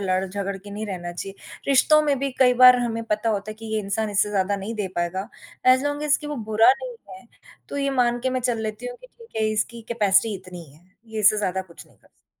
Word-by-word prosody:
लड़-झगड़ 195 +1 -2
के 200 +1 -12
नहीं 215 +2 -5
रहना 175 -3 -5
चाहिए, 195 +3 -7 0.3
रिश्तों 305 +3 +5
में 285 -3 +1
भी 275 0 -1
कई 250 -1 +5
बार 250 0 +8
हमें 230 -2 -2
पता 215 +1 -1
होता 205 0 -2
है 215 - -7
कि 225 +1 -10
ये 215 - +1
इंसान 210 +2 -2
इससे 205 +1 +1
ज़्यादा 200 0 0
नहीं 205 +4 -5
दे 205 -3 -3
पाएगा, 185 +5 -2 0.4
एज 255 +1 +6
लॉन्ग 290 0 -2
एज 300 -1 +3
कि 300 - -9
वो 295 -1 -4
बुरा 225 +4 +6
नहीं 250 -2 -6
है, 190 +5 -12 0.4
तो - - -6
ये 275 -1 0
मान 240 -2 +1
के 260 +1 -1
मैं 255 0 -1
चल 240 -2 0
लेती 215 - -5
हूँ - - -6
कि - - -14
ठीक 465 -2 -18
है - - +3
इसकी 230 +2 -2
कैपेसिटी 210 -2 +2
इतनी 180 -2 -9
ही 140 - -19
है, 160 +4 -22 0.2
ये 220 -1 -5
इससे 210 +1 +5
ज़्यादा 190 -2 -1
कुछ 170 -3 -15
नहीं - - -25
कर - - -27
सकता। - - -45
215 Hz, 255 wpm, -23 LUFS, 195-255 Hz, 0.4 s, बार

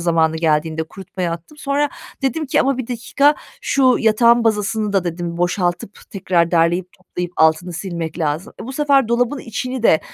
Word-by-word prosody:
zamanı 165 -2 +2
geldiğinde 160 0 0
kurutmaya 180 0 -5
attım. 170 - -9
Sonra 285 +1 0 0.3
dedim 305 +3 -1
ki, - - +2
"Ama 270 -1 +1
1 255 - -3
dakika, 265 +5 +2 0.3
şu 260 -3 +3
yatağın 235 +1 +4
bazasını 210 -1 0
da" 195 -3 +1
dedim, 170 0 -4
"boşaltıp 175 +2 -1
tekrar 175 -3 +1
derleyip 175 +2 +1
toplayıp 180 -1 -6
altını 160 +3 +3
silmek 170 -2 -5
lazım." 160 +7 -2
E, - - -6
bu 265 - -6
sefer 275 -4 +2
dolabın 245 +4 +1
içini 255 +1 -4
de, 160 -8 +5
190 Hz, 165 wpm, -19 LUFS, 170-245 Hz, 0.3 s, de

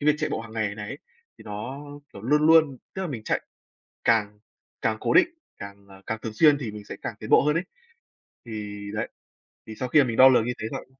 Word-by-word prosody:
cái 145 - -3
việc 150 - +6
chạy - - -1
bộ - - -2
hàng 115 -1 -10
ngày 110 -2 -1
này 105 -1 -7
ấy 140 - -6 0.4
thì - - -14
nó, 110 +7 -6 0.3
kiểu, 100 - -11
luôn 150 +5 +3
luôn 155 -5 +5 0.2
tức 190 - -3
là 180 - -3
mình 120 -6 -5
chạy - - 0 0.6
càng 105 -3 +2 0.4
càng 110 -1 +1
cố - - 0
định, 370 -2 +6 0.3
càng, 100 0 -10
ờ, 95 0 -15
càng 110 0 -2
thường 110 - -4
xuyên 150 +2 +5
thì 120 -6 -4
mình 105 -1 -9
sẽ - - -8
càng - - -4
tiến - - -7
bộ - - +7
hơn 150 +2 +2
ấy. 175 - 0 0.8
Thì 105 -2 -6 0.2
đấy, 105 - -2 0.6
thì 110 - -8
sau 125 +3 -3
khi 150 - +5
mà 135 - +1
mình 115 -1 -3
đo 130 +1 +9
lường 120 -3 +4
như 125 - -1
thế 110 - -3
rồi - - -5
115 Hz, 250 wpm, -25 LUFS, 105-145 Hz, 0.8 s, đo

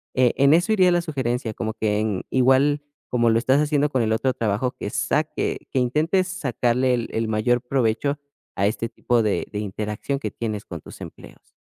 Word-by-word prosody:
eh, 125 -2 +3
en 140 +2 +5
eso 175 +7 +3
iría 185 -3 +4
la 175 - +2
sugerencia, 125 -7 -2
como 110 0 -3
que 105 -2 0
en, 105 -4 -1
igual 135 +3 +3 0.3
como 120 -2 +3
lo 115 - +3
estás 130 +4 +3
haciendo 150 -1 +1
con 130 -3 0
el 110 - 0
otro 130 +3 +1
trabajo 115 +2 0
que 105 - -4
saque 150 +3 -1
que 130 - +1
intentes 155 +9 +1
sacarle 125 -7 0
el 120 - -3
el 115 0 -1
mayor 120 +3 +1
provecho 130 +2 0 0.4
a 100 - +2
este 115 +2 -2
tipo 120 0 0
de 105 - 0
de 105 - -3
interacción 105 +6 -3
que - - -4
tienes 110 -3 -4
con 85 -3 -7
tus - - -13
empleos. - - -12
125 Hz, 195 wpm, -23 LUFS, 110-140 Hz, 0.4 s, en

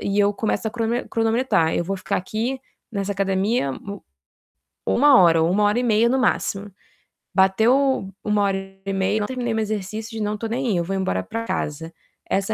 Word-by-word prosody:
e 200 +1 -1
eu 205 0 +3
começo 220 +1 -1
a - - -7
cronome 230 +1 -2
cronometrar: 225 -7 +1
"Eu - - 0
vou 195 +2 -2
ficar 185 - -2
aqui 230 +8 -3 0.3
nessa 200 -1 -2
academia 195 - 0
u 200 +8 -8 0.9
uma 275 -4 +6
hora 165 -2 +5
ou 165 - +2
1 205 +3 +2
hora 210 +3 +2
e - - -1
meia 230 0 +3
no 265 +2 +2
máximo. 205 -4 0 0.6
Bateu 220 +4 +3
1 210 -1 +1
hora 195 -1 +1 0.3
e 195 - -1
meia 190 +1 0
e - - +1
eu - - -3
não 205 - 0
terminei 245 -3 -2
meu 220 - 0
exercício, 215 +2 -4
não 210 0 -1
tô 225 - -4
nem 250 +3 -2
aí, 195 - +1
eu 170 - 0
vou 195 +3 -3
embora 95 - -1
pra 230 - -5
casa.", 160 -5 -4 0.4
essa 195 +2 0
210 Hz, 205 wpm, -22 LUFS, 195-230 Hz, 0.9 s, uma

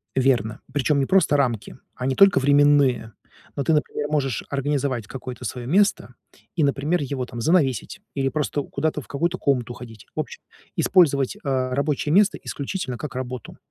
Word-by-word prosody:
Верно, 125 -5 +1
причём 145 +1 +1
не 135 - +1
просто 180 -6 +3
рамки, 120 -4 -1 0.2
а 125 - -4
не 135 - +1
только 195 +6 +6
временные. 140 -5 +3 0.4
Но 140 - -1
ты, 160 - +2
например, 150 -1 0
можешь 140 -6 -1
организовать 140 -5 -1
какое-то 125 -1 -8
своё 120 +3 -5
место 200 +8 +2 0.4
и, 160 - +2
например, 145 +5 +1
его 135 -2 -3
там 120 -1 -8
занавесить 150 - +1
или 135 -1 0
просто 145 +1 -1
куда-то 150 +1 -2
в 125 - -15
какую-то 170 +5 -1
комнату 125 -4 0
уходить. 115 -4 -11
В - - -1
общем, - - -7 0.3
использовать, 140 -8 +3
а, 130 -2 -1
рабочее 145 +1 0
место 205 +2 +4
исключительно 140 -4 -4
как 150 - -6
работу. 125 -3 -6
140 Hz, 165 wpm, -23 LUFS, 125-150 Hz, 0.4 s, только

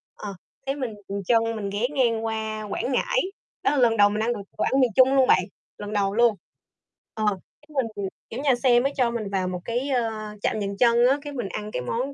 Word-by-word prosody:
ờ, 200 -2 -7 0.3
thế 275 - 0
mình 255 -6 -3 0.2
dừng 200 0 -3
chân, 230 -1 +3
mình 200 -2 -3
ghé 210 +5 0
ngang 230 -4 +2
qua 220 -1 -3
Quảng 255 - -2
Ngãi. - - +1 0.4
Đó - - +3
là 295 - 0
lần 235 -3 +4
đầu 205 0 +6
mình 210 +1 -1
ăn 240 +2 +1
đồ 210 - -6 0.2
đồ - - 0
ăn 270 - +2
miền 250 -3 +3
Trung 260 +1 +6
luôn 265 -1 +5
bạn, - - +5 0.3
lần 205 0 -6
đầu 200 -1 +1
luôn. 235 -2 +4 0.8
Ờ, 215 - -2 0.4
cái 300 - -25
mình 265 -6 0 0.4
kiểu, 240 - -4
nhà 275 -4 +4
xe 245 -2 +6
mới 275 +3 0
cho 245 -3 +2
mình 225 -4 -3
vào 190 -2 0
một 180 -1 -4
cái, 245 +4 -2
ơ, 240 -4 +1 0.3
trạm 215 - 0
dừng 200 0 -3
chân 240 0 +5
á, 270 +2 +3
cái 290 0 -7
mình 240 -7 -3
ăn 210 0 -5
cái 125 - -3
món 250 - -2
235 Hz, 240 wpm, -25 LUFS, 210-260 Hz, 0.8 s, đầu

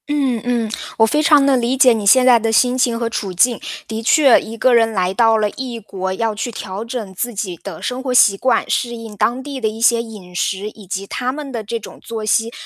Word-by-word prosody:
嗯 275 -6 0
嗯， 235 -3 -1 0.3
我 225 - +5
非 300 +7 +1
常 295 -2 +5
地 275 -1 +4
理 245 +1 0
解 255 -2 +6
你 215 -2 -3
现 255 +4 +6
在 245 -2 +6
的 225 0 -1
心 250 +3 +3
情 240 -2 +1
和 235 - -1
处 200 -4 -4
境。 235 +7 +2 0.3
的 220 0 -4
确， 270 +2 +5
一 225 +1 -9
个 255 +2 +3
人 225 -1 +4
来 185 -3 -1
到 225 +1 +3
了 215 -1 +1
异 250 -3 -6
国， 190 -3 -5
要 225 +2 -1
去 225 +3 -4
调 200 -2 -6
整 230 -4 -6
自 240 +6 -3
己 190 -3 -4
的 - - -7
生 250 +1 -3
活 260 -1 -3
习 215 -5 +5
惯， 240 +3 0
适 240 -1 -1
应 225 -2 -9
当 240 +5 0
地 280 -2 -7
的 220 - +1
一 215 +1 -5
些 235 0 +3
饮 205 -6 -11
食， 195 +3 -2
以 210 -2 -15
及 195 +1 -4
他 250 +4 -3
们 285 0 -7
的 230 -3 -4
这 230 +3 -4
种 - - -12
作 225 -2 -6
息， 225 +2 +1
230 Hz, 265 characters per minute, -18 LUFS, 215-250 Hz, 0.3 s, 解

